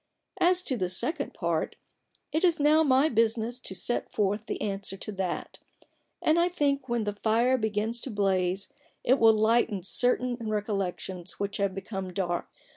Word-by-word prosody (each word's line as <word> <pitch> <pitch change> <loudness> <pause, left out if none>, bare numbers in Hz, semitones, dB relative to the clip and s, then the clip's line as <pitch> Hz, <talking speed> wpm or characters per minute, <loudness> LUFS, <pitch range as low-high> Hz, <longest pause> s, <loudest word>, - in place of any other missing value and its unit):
As 360 +1 +4
to 260 - -1
the 185 -4 -1
second 290 - -1
part, 170 -3 -1 0.6
it 315 - 0
is 345 -3 +3
now 300 +2 +5
my 275 -1 +4
business 230 -1 +1
to 190 -6 -7
set 240 - -2
forth 205 +2 -1
the - - -3
answer 195 -1 -3
to 215 - -5
that: 190 -3 -4 0.6
and 315 +2 +4
I 345 - +4
think 280 -6 0
when 235 -2 0
the 205 -1 -3
fire 235 +4 +3
begins 220 0 -1
to - - -4
blaze 195 -3 0 0.3
it 260 +2 +3
will 225 -1 +7
lighten 220 -2 +2
certain 245 +4 +1
recollections 195 -4 -3
which 200 +1 -2
have 200 -2 0
become 190 -1 -5
dark. 175 -2 -2
220 Hz, 165 wpm, -28 LUFS, 195-255 Hz, 0.6 s, will